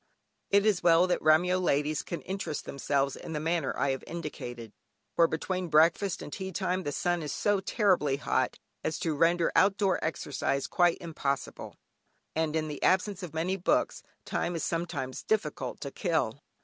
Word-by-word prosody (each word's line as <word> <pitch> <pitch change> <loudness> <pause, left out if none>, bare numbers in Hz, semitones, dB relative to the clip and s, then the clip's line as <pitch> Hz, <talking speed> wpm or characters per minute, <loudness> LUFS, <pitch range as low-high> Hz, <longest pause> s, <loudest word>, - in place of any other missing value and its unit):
It 200 +1 +4
is 210 -4 +3
well 170 +1 +5
that 180 - +1
the - - -17
Remyo 175 +4 +4
ladies 150 -2 +1
can 170 - -5
interest 190 -5 -4
themselves 140 0 0
in 165 - -7
the 150 - -1
manner 165 -2 0
I 140 - +1
have 135 - -4
indicated, 120 -9 -6 0.4
for 165 - +5
between 180 +3 -2
breakfast 165 +5 +3
and 145 - -8
tea 190 -1 -4
time 185 0 -1
the 145 - -3
sun 175 +3 0
is 150 - -4
so 205 -1 +1
terribly 190 - +2
hot, - - 0 0.3
as 155 0 -1
to 160 - -1
render 165 +3 +3
out 195 +1 +4
door 195 -3 +1
exercise 140 -3 -1
quite 175 -1 +3
impossible, 145 -6 -4 0.6
and 160 -1 0
in 155 -1 0
the 150 - -6
absence 190 +1 +2
of 175 -3 -7
many 180 +4 0
books 180 - +1 0.2
time 175 - -2
is 165 - -2
sometimes 165 -6 -3
difficult 220 -1 -2
to - - -5
kill. - - -1
165 Hz, 175 wpm, -29 LUFS, 150-185 Hz, 0.6 s, well